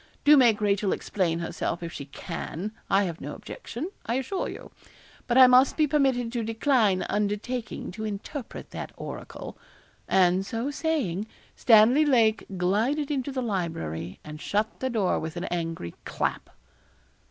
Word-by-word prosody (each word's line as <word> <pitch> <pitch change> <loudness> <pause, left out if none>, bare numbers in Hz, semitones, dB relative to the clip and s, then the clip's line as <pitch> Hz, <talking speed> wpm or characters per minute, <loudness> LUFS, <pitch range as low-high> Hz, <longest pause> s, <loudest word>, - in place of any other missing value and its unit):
Do 295 +1 +8
make 235 -6 +5
Rachel 200 -1 +2
explain 175 -5 -1
herself, 170 0 -3
if 170 - -5
she 140 - -6
can 165 +7 -6 0.2
I 195 +1 +4
have 170 -4 -4
no - - -5
objection, 320 - -7
I 230 - -1
assure 270 +9 -2
you; - - -9 0.6
but 245 0 +2
I 260 - +10
must 255 +1 +5
be 310 - +4
permitted 270 -5 +1
to 235 -2 -2
decline 225 -3 +2
undertaking 210 +3 -2
to 215 +4 -7
interpret 220 +5 -6
that - - -6
oracle.' - - -8 0.5
And 185 0 +4
so 230 +7 -3
saying, 270 - -1 0.3
Stanley 235 +6 +6
Lake 230 -7 +3
glided 230 +12 +1
into 280 -1 -1
the 260 -1 -2
library 90 - -3
and 150 +1 -9
shut 215 +2 -1
the 260 - -1
door 215 -6 +1
with 160 +2 -5
an 175 - -3
angry 165 - -3
clap. - - -2
220 Hz, 155 wpm, -27 LUFS, 180-260 Hz, 0.6 s, I